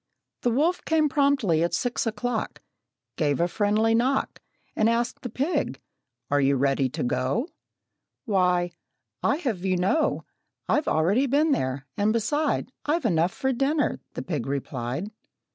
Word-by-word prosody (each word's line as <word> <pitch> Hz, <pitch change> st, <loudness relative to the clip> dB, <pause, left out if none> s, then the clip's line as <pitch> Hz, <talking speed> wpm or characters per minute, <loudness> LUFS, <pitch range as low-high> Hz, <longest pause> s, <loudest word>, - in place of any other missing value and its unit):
The 245 Hz, -, +2 dB
wolf 305 Hz, +9 st, +1 dB
came 315 Hz, -2 st, +2 dB
promptly 270 Hz, -, +2 dB
at 170 Hz, -, +1 dB
six 245 Hz, -1 st, -1 dB
o'clock, 230 Hz, +1 st, -3 dB, 0.5 s
Gave 145 Hz, -2 st, +1 dB
a 170 Hz, -, +3 dB
friendly 215 Hz, +4 st, +2 dB
knock, 255 Hz, +4 st, 0 dB, 0.3 s
And 220 Hz, +1 st, +3 dB
asked 235 Hz, +1 st, -1 dB
the 245 Hz, -, -5 dB
pig, 275 Hz, -, -1 dB, 0.5 s
"Are 145 Hz, 0 st, +3 dB
you 140 Hz, 0 st, +3 dB
ready 135 Hz, 0 st, +1 dB
to -, -, -4 dB
go?" 130 Hz, -, 0 dB, 0.8 s
"Why, 180 Hz, -5 st, +2 dB, 0.5 s
I'd 290 Hz, +4 st, +1 dB
have 220 Hz, -, -2 dB
you 185 Hz, -1 st, +1 dB
know 195 Hz, -, +1 dB, 0.4 s
I've 300 Hz, -, +1 dB
already 195 Hz, -, +2 dB
been 295 Hz, +4 st, +3 dB
there, 130 Hz, -, -1 dB
and 205 Hz, +1 st, +2 dB
beside 290 Hz, +4 st, 0 dB
I've 310 Hz, -1 st, 0 dB
enough 170 Hz, -3 st, +2 dB
for 265 Hz, +5 st, -1 dB
dinner," 280 Hz, +4 st, 0 dB, 0.2 s
the -, -, -4 dB
pig 145 Hz, -9 st, -3 dB
replied. 135 Hz, -, -3 dB
215 Hz, 145 wpm, -26 LUFS, 160-270 Hz, 0.8 s, a